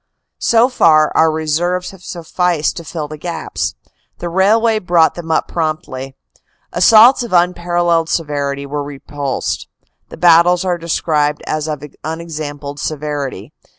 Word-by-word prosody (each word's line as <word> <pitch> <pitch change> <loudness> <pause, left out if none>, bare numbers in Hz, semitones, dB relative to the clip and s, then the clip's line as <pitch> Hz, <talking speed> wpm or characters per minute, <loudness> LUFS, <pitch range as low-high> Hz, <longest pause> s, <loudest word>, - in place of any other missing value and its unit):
" - - -59
So 235 +1 +5
far, 155 - +4
our 160 - +4
reserves 165 +4 -1
have 190 -2 -15
sufficed 170 -2 -1
to 170 - -6
fill 155 -1 -5
the 155 0 -9
gaps. 170 +2 -4 0.4
The 175 - -5
railway 215 +5 +3
brought 175 -4 +3
them 170 -2 -8
up 160 - +1
promptly. 145 -5 -4 0.6
Assaults 225 +8 +6
of 235 -5 -5
unparalleled 175 -1 +1
severity 140 -3 -2
were 145 +1 -3
repulsed. 140 -1 -4 0.4
The - - -10
battles 175 +1 +5
are 175 -2 0
described 150 -3 0
as 155 0 -2
of 150 -2 -4 0.2
un 160 +2 -4
exampled 145 -3 -6
severity. 145 -6 -4
160 Hz, 140 wpm, -16 LUFS, 150-175 Hz, 0.6 s, Assaults